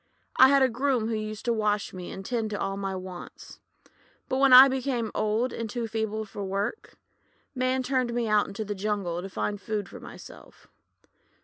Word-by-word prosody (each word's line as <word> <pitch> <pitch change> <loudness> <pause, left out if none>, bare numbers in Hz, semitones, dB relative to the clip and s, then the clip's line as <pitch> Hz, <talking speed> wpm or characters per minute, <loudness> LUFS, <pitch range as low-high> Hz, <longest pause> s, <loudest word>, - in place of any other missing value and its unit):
I 260 - +9
had 275 0 +5
a - - +5
groom 250 -2 0
who - - -1
used 215 0 -5
to 235 - +2
wash 210 -2 0
me 180 -1 -7
and 195 0 -8
tend 230 -2 -2
to 205 - -4
all 195 - -2
my 195 -1 -3
wants. 185 -1 -9 0.7
But 260 -1 -1
when 275 -1 +5
I 255 +2 +11
became 260 -4 -2
old 215 +4 0
and 230 -1 -4
too 235 +1 -3
feeble 220 -1 -3
to 205 0 -8
work, 195 - -3 0.6
Man 255 0 0
turned 255 -2 0
me 235 -1 -1
out 210 -1 +3
into 200 +2 -5
the 205 - -3
jungle 195 -4 -2
to 195 - -7
find 205 +1 -3
food 210 -3 -3
for - - -11
myself. - - -13
220 Hz, 195 wpm, -27 LUFS, 205-250 Hz, 0.7 s, I